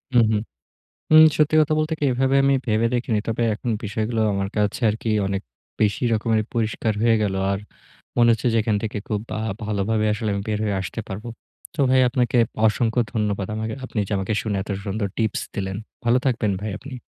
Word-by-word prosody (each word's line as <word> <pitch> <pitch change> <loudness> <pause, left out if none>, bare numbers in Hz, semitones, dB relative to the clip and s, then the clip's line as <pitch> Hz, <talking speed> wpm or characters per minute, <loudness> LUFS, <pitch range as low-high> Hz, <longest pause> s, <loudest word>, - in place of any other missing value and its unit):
হু, - - +8
হু। 110 - +2 0.8
উম 155 0 +10
সত্যি 155 0 +3
কথা 155 0 +2
বলতে 155 +1 0
কি - - -1
এভাবে 130 +2 +1
আমি 140 0 +4
ভেবে 110 0 +2
দেখিনি। 120 -3 0
তবে 115 +1 -1
এখন 120 +3 -4
বিষয়গুলো 110 +2 -2
আমার 100 0 -1
কাছে 105 +2 0
আরকি 110 +2 -4 0.2
অনেক 95 0 -2 0.4
বেশি 105 0 +1
রকমের 110 0 +1
পরিষ্কার 110 -1 0
হয়ে 115 -1 +4
গেল। 100 -2 0 0.2
আর 100 - -1 0.6
মনে 120 -1 +5
হচ্ছে 115 +2 -2
যে - - +2
এখান 110 -1 +1
থেকে 110 -1 -3
খুব 105 -2 -1
ভা - - -3 0.3
ভালোভাবে 105 +1 0
আসলে 110 +1 -2
আমি 100 - -2
বের 105 -1 0
হয়ে 105 -2 0
আসতে 95 +4 -5
পারবো। 105 +4 -6 0.5
তো - - -17
ভাই 130 0 +5
আপনাকে 120 -1 +1 0.3
অসংখ্য 115 +2 +1
ধন্যবাদ। 105 -4 -1
আমাকে 110 0 -3
আপনি 125 - -5
যে - - -4
আমাকে 95 +2 -2
শুনে 105 -3 -2
এত 105 - -9 0.2
সুন্দর 100 +1 -1
টিপস 110 -3 0
দিলেন। 95 -1 -3 0.3
ভালো 120 +2 +4
থাকবেন 120 -5 +1
ভাই 105 +1 -3
আপনি। 135 +2 -9
110 Hz, 195 wpm, -23 LUFS, 105-120 Hz, 0.8 s, উম